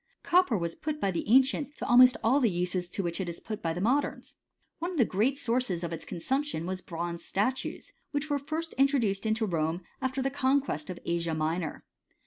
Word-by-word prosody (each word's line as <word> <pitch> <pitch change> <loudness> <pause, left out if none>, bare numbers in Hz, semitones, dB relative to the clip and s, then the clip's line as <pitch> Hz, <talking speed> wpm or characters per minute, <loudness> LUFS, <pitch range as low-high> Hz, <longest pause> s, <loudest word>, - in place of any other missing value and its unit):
* - - -51
Copper 355 - +4
was 170 -2 -2
put 305 - -4
by 195 - +1
the 170 - -3
ancients 265 +4 +3
to - - -4
almost 250 +1 +7
all 255 +6 +4
the 240 -5 +3
uses 180 0 -1
to 195 - -3
which 170 +2 -2
it 180 - -3
is 170 - -7
put 215 -2 -6
by 165 - -1
the 170 - -3
modems. 260 +8 0 0.5
One 345 - -2
of 365 - -5
the 245 - +5
great 230 +9 +1
sources 230 -9 0
of 170 - -3 0.2
consumption 265 - -2
was 185 +1 -4
bronze 170 0 -5
statues, 255 +7 -2 0.2
which 290 +1 -2
were 290 -2 0
first 320 +4 -4
introduced 230 -8 +2
into 220 +1 +1
Rome 165 -2 -1 0.2
after 260 0 -1
the 270 - 0
con 270 0 +3
quest 155 - -4
of 180 - -5
Asia 170 -1 -1
Minor. 155 +1 -2
220 Hz, 210 wpm, -29 LUFS, 175-270 Hz, 0.5 s, almost